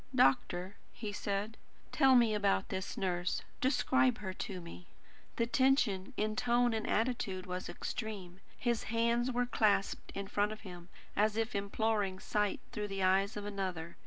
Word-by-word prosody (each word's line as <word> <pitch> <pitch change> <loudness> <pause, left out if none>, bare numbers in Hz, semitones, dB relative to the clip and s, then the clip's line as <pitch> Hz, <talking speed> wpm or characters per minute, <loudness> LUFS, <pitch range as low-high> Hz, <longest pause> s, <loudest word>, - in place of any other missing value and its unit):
"Doctor," 180 - +2 0.2
he 215 -2 -5
said, 205 +2 -2 0.3
"tell 270 -3 +5
me 235 -3 +5
about 200 -2 +1
this 190 0 -4
nurse. 180 -1 -1 0.2
Describe 260 -1 +3
her 190 -4 -5
to 190 -1 -5
me." 175 +1 -10 0.5
The 230 - +1
tension 240 -7 +2
in 215 0 0
tone 240 0 +2
and 220 -1 -2
attitude 215 -5 0
was 180 0 -4
extreme. 190 -1 -5 0.2
His 235 -2 0
hands 235 +2 +1
were 245 0 +1
clasped 210 -4 +1
in 200 0 -4
front 205 +1 +1
of 215 - -11
him, 180 -3 -10 0.3
as 210 +1 +2
if 225 +2 0
imploring 200 -1 0
sight 210 0 0
through 210 -3 -3
the 195 -1 -3
eyes 195 +3 +3
of 205 - -5
another. 185 -5 -4
210 Hz, 160 wpm, -34 LUFS, 190-230 Hz, 0.5 s, tell